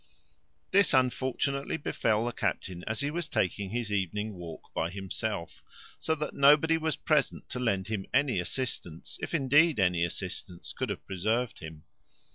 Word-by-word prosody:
This 200 -5 +5
unfortunately 130 +3 +1
befel 115 -6 0
the 120 - -1
captain 90 -5 -3
as 110 +4 0
he 145 +1 0
was 170 +1 -2
taking 95 +1 0
his 115 0 -2
evening 105 +2 -1
walk 85 -3 -9
by 80 - 0
himself, 95 -1 -4 0.4
so 160 - +1
that 150 -1 -4
nobody 150 +3 +6
was 160 -1 0
present 150 -3 +1
to 125 - -4
lend 100 -6 0
him 105 -3 -3
any 130 -6 +2
assistance, 90 -6 -3
if - - -2
indeed, 145 +1 +4
any 90 -2 +3
assistance 90 0 -3
could - - -3
have - - -5
preserved 110 +5 -1
him. 80 -2 -9
110 Hz, 155 wpm, -29 LUFS, 95-140 Hz, 0.4 s, nobody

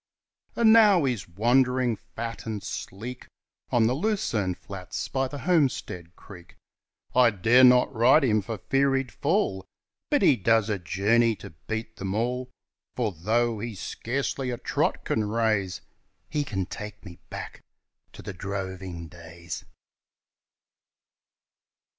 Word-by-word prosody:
And 225 -2 +6
now 210 -7 +6
he's 120 -9 -2
wandering, 125 +5 +2
fat 115 +1 -7
and 105 -3 -4
sleek, 115 +6 -7 0.4
On 120 -2 +3
the 120 - +2
lucerne 130 - -1
flats 95 -1 -6
by 135 0 -1
the 145 - -7
Homestead 130 - 0
Creek; 90 -4 -14 0.6
I 125 -1 +6
dare 115 +5 +4
not 125 +1 +6
ride 130 +6 +5
him 110 -5 +3
for 110 +3 -5
fear 135 +7 +1
he'd 135 -1 -2
fall, 145 - 0 0.5
But - - +2
he 130 - +5
does 110 +1 +2
a 100 - -1
journey 105 +7 +2
to 100 -1 -11 0.2
beat 110 0 -4
them 95 0 -3
all, 125 +3 -1 0.5
For 115 -4 0
though 110 +6 0
he 115 0 -5
scarcely 130 +6 -3
a 120 - -3
trot - - -1
can 110 -1 0
raise, 105 -4 0 0.5
He 150 - 0
can 95 -7 -2
take 105 +2 -8
me 85 -2 -11
back - - -8 0.5
to - - -11
the 100 +1 -6
droving 95 -2 -5
days. 85 0 -9
115 Hz, 135 wpm, -26 LUFS, 95-125 Hz, 0.6 s, And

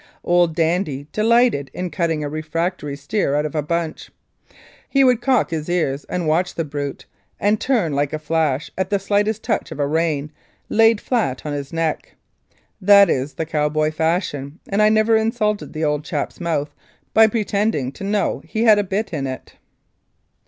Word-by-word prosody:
Old 175 -2 +2
"Dandy" 165 -4 0
delighted 225 - +2
in 180 -1 -4
cutting 165 -4 -1
a - - -2
refractory 155 0 -3
steer 145 +1 -1
out 150 +1 +1
of 150 - -4
a 155 - 0
bunch. 165 +1 -3 0.8
He 275 -1 +4
would 250 -2 +4
cock 250 -6 +2
his 155 0 -3
ears 150 -6 -1
and 175 -3 -3
watch 170 +4 +1
the 165 - -2
brute, 145 -1 -5 0.3
and 210 +2 +1
turn 220 - +1
like 140 0 0
a 155 - -2
flash 155 -2 -1
at 190 - -2
the 205 - +2
slightest 205 +2 0
touch - - -1
of - - -7
a 145 - +2
rein 150 -1 -1 0.4
laid 225 0 +4
flat 210 - -1
on 150 - -3
his 140 -1 -5
neck. 165 -1 -2 0.7
That 200 -1 +7
is 135 +2 -2
the 160 - -2
cowboy 155 0 0
fashion, 155 -3 -2
and 200 +1 +1
I 215 - +6
never 215 +1 +3
insulted 215 -1 0
the 155 0 -2
old 150 0 0
chap's - - -4
mouth 155 -4 -2 0.4
by 220 0 +7
pretending 205 - 0
to 170 - -10
know 205 +1 0
that - - -23
he 220 - -1
had 215 -3 +6
a - - +1
bit 195 +1 -3
in 140 -3 -2
it. 130 0 -7
165 Hz, 180 wpm, -20 LUFS, 150-205 Hz, 0.8 s, That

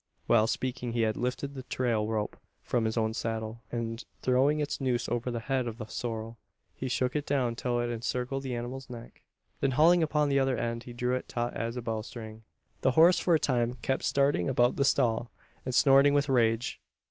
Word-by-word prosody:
While 110 -2 +4
speaking 125 -1 -2
he 115 - +1
had 110 -1 +1
lifted 125 +3 -3
the 135 - -6
trail 120 -4 -1
rope 110 -1 -2 0.3
from 120 -2 0
his 110 +1 -1
own 110 -1 +1
saddle; 110 0 -4
and, 115 0 -3 0.2
throwing 135 +4 +3
its 145 -1 -2
noose 125 -2 0
over 120 +1 -2
the 120 -1 -3
head 130 0 -1
of 115 -1 -5
the 115 - -6
sorrel, 115 0 -5 0.3
he 130 - -5
shook 125 +2 0
it 150 - 0
down 130 -5 +1
till 120 0 -1
it 120 0 -1
encircled 125 +3 -2
the 130 -2 -4
animal's 125 +2 -6
neck. 120 -1 -10 0.4
Then 135 - +2
hauling 170 +3 +6
upon 150 -2 +1
the 140 0 +3
other 135 -1 +1
end, 115 0 -3
he 120 - -8
drew 125 +1 -1
it 130 - -2
taut 120 0 -2
as 115 +2 -3
a 125 - -4
bowstring. 110 0 -5 0.4
The 130 - +2
horse 170 +3 +7
for 175 - +3
a - - +3
time 120 -3 0
kept 135 - 0
starting 140 0 +2
about 120 -1 +3
the 140 - +1
stall, 120 -4 +2 0.4
and 130 -1 -2
snorting 140 +2 +6
with 145 0 +2
rage. 115 -2 +1
125 Hz, 205 wpm, -29 LUFS, 115-135 Hz, 0.4 s, horse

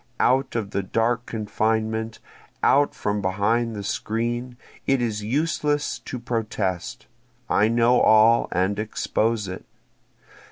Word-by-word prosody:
Out 130 +1 +2
of 105 -4 -2
the 100 - -1
dark 115 +5 0
confinement! 110 0 -1 0.5
out 145 +1 +4
from 105 0 -2
behind 110 +5 0
the 100 - -5
screen! 120 +4 -3 0.3
It 135 -1 +3
is 110 -3 -2
useless 145 +4 0
to 125 - -7
protest, 110 -2 -3 0.4
I 105 - +3
know 120 +2 +3
all 110 +2 +5
and 95 +3 0
expose 110 0 -1
it. 90 - -7
115 Hz, 120 wpm, -24 LUFS, 105-120 Hz, 0.5 s, all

